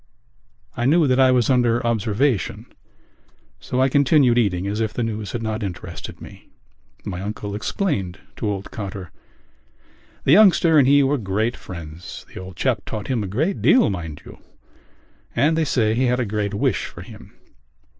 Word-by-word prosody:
I 120 - -2
knew 160 +3 +4
that 130 -1 +2
I 130 -1 +6
was 125 -2 +3
under 120 -2 +2
observation 115 - 0 0.9
so 125 - -3
I 130 - +4
continued 140 -2 +4
eating 95 -6 +1
as 105 +2 -2
if 110 -1 -1
the 120 - -1
news 110 -3 -4
had 115 - -3
not 110 0 -3
interested 95 -4 -7
me. - - -13 0.6
My 95 -3 -4
uncle 105 0 -5
explained 105 - -2 0.2
to 105 - -2
old 100 -1 -5
Cotter. 95 -5 -7 1.1
"The - - +2
youngster 170 -4 +6
and 130 - +4
he 140 +1 +5
were 140 +1 +1
great 110 +3 -1
friends. 85 -1 -9
The - - -7
old 95 -1 -10
chap - - 0
taught 105 +2 -6
him 120 -5 0
a - - -4
great 155 - -1
deal, 255 - +4
mind 85 -6 -6
you; - - -12 1.0
and 155 +3 +3
they 160 -1 +1
say 110 -6 +1
he 125 +3 +1
had 125 0 +1
a 125 - 0
great 105 -1 -2
wish 105 -2 0
for - - -10
him." - - -14
115 Hz, 175 wpm, -22 LUFS, 100-130 Hz, 1.1 s, I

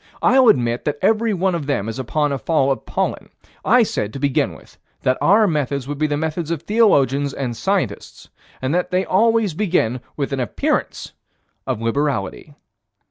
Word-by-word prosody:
I'll 260 -1 +5
admit 120 - +2
that 150 -1 -1
every 220 +3 +2
one 190 -1 0
of 155 -5 -3
them 125 -8 -1
is 115 +3 -5
upon 145 +4 -1
a 140 - -2
fall 140 -3 +1
of 135 - -4
pollen. - - -2 0.3
I 240 +3 +5
said, 105 - -3
to 135 - -6
begin 140 -1 0
with, - - -18 0.2
that 130 - +2
our 210 +4 +5
methods 140 -6 -1
would 145 0 -5
be 155 - +2
the 145 -1 -1
methods 160 +1 -3
of 165 -3 -3
theologians 145 - +2
and 125 -4 -3
scientists, 180 - -3 0.4
and 130 +3 0
they 180 +1 0
always 225 -1 +2
begin 155 - 0 0.2
with 140 -1 -2
an 135 - -2
appearance 125 - -2 0.5
of 110 - -2
liberality. 140 +2 -2
145 Hz, 175 wpm, -20 LUFS, 130-185 Hz, 0.5 s, I'll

